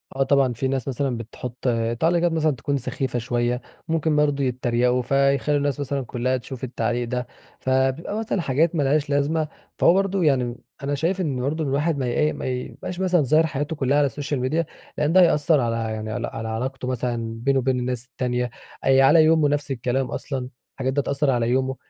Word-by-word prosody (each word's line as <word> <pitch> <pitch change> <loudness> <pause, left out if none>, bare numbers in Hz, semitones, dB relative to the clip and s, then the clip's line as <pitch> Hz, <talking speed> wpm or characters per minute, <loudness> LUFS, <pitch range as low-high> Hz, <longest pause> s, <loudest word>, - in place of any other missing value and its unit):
آه 135 - +2
طبعًا، 135 -2 +3
في 125 +4 -2
ناس 135 -1 -2
مثلًا 135 -1 -1
بتحط 120 +2 -8 0.4
تعليقات 170 +1 +2
مثلًا 160 -1 +2
تكون 140 +4 -1
سخيفة 125 -1 -2
شويّة، 120 +1 -1 0.3
ممكن 160 -1 +1
برضو 145 -2 +2
يتريقوا 125 0 +1
فيخلوا 140 +2 +2
الناس 145 0 -1
مثلًا 140 0 -2
كلّها 125 +2 -1
تشوف 125 +1 -9
التعليق 120 -1 -1
ده، 125 0 -3 0.3
فبيبقى 130 +9 0
مثلًا 215 -4 -1
حاجات 160 +4 +1
ما 150 - +2
لهاش 145 +1 +1
لازمة. 150 +2 +1 0.3
فهو - - +6
برضو 195 0 +1
يعني، 130 -6 +2 0.3
أنا 145 +1 0
شايف 170 +6 0
إنّه 140 -7 -1
برضو 150 +5 -1
الواحد 145 +3 0
ما 135 - -1
ي 120 - -1
إيه، 150 0 +2
ما - - -6
يبقاش 130 +7 -5
مثلًا 180 -3 +3
ظاهر 155 +4 +4
حياته 150 +2 -3
كلّها 140 -1 +1
على 145 - +4
السوشيال 140 +1 -3
ميديا 155 +7 0 0.3
لأن 150 +2 +1
ده 185 - +7
هيأثر 160 -2 +4
على 115 -2 0
يعني 110 -1 -3
على 120 +1 -2
على 110 -1 -5
علاقته 125 +4 -3
مثلًا 120 -2 -2
بينه 135 0 +3
وبين 130 0 +1
الناس 125 -1 -2
التانية، 125 -1 -2 0.3
آآ 135 0 +5
على 155 +4 +7
يومه 160 -1 +4
نفس 145 0 -1
الكلام 130 +1 0
أصلًا، 130 -3 -4 0.2
الحاجات 130 0 -2
ده 145 - +2
هتأثر 140 +1 0
على 120 -2 +1
يومه، 130 +1 +1
135 Hz, 195 wpm, -23 LUFS, 125-150 Hz, 0.4 s, ده